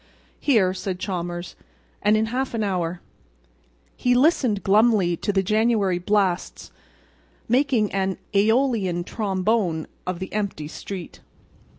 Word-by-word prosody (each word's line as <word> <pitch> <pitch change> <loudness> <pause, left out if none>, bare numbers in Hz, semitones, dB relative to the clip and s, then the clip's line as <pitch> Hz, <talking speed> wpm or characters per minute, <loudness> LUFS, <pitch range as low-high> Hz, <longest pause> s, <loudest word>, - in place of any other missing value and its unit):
"Here," 210 -10 +3
said 185 -1 -4
Chalmers, 175 -2 -4 0.5
"and 210 +1 +4
in 220 - +2
half 260 -1 -1
an 220 - 0
hour." 180 -3 -2 0.9
He 245 0 +2
listened 250 - +2
glumly 205 -3 +4
to 205 - -1
the 195 -1 +1
January 215 -3 +2
blasts 190 -1 -1 0.8
making 245 -3 +2
an 190 -1 0 0.2
Aeolian 215 -4 +2
trombone 190 -4 -1 0.2
of 185 -1 -2
the 190 +2 -7
empty 200 -8 -3
street. 180 +3 -8
200 Hz, 115 wpm, -23 LUFS, 180-225 Hz, 0.9 s, and